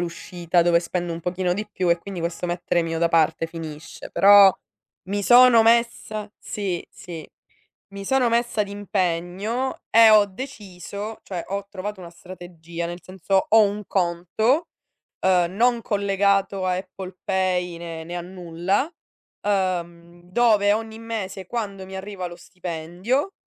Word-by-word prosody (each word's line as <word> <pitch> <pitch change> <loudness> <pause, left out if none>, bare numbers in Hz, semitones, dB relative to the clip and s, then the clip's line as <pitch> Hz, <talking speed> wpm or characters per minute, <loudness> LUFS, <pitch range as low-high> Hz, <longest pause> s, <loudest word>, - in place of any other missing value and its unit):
l'uscita 175 0 -1
dove 170 0 +4
spendo 175 0 -3
un 165 - -6
pochino 180 +1 -1
di 210 +2 -4
più; 185 -3 -1
e 170 - +3
quindi 195 +1 -8
questo 170 +1 -3
mettere 175 0 0
mio 165 0 -3
da 170 - +3
parte 165 0 +2
finisce. 160 -1 -9
Però 200 -1 +8 0.6
mi 205 +1 -1
sono 245 -1 +7
messa 225 -2 +1
si, 195 -5 -4
sì, 165 -3 -9 0.7
mi 200 0 -7
sono 260 +2 +2
messa 235 -2 +1
d'impegno, 200 +4 -2
e 225 -1 +8
ho 210 -1 +6
deciso, 205 -2 -8
cioè, 180 -3 -5
ho 200 0 -3
trovato 200 0 -6
una 175 -2 -9
strategia, 170 -1 -8
nel 175 +1 -7
senso 190 +1 0
ho 220 0 +7
un 205 0 0
conto, 195 - 0 0.5
ehm, 180 -2 +2
non 240 +3 +3
collegato 200 -2 +1
a 180 - +1
Apple 185 0 -8
Pay 180 -2 0
né 165 -1 -7
né 175 +2 -6
a - - -3
nulla, 180 - -2 0.5
ehm, 175 -3 -2
dove 210 -1 +4
ogni 220 0 -5
mese, 200 -5 -5
quando 200 -3 -4
mi 190 0 -8
arriva 190 -1 -6
lo 175 -1 -8
stipendio, 180 - -3
190 Hz, 145 wpm, -23 LUFS, 175-210 Hz, 0.7 s, Però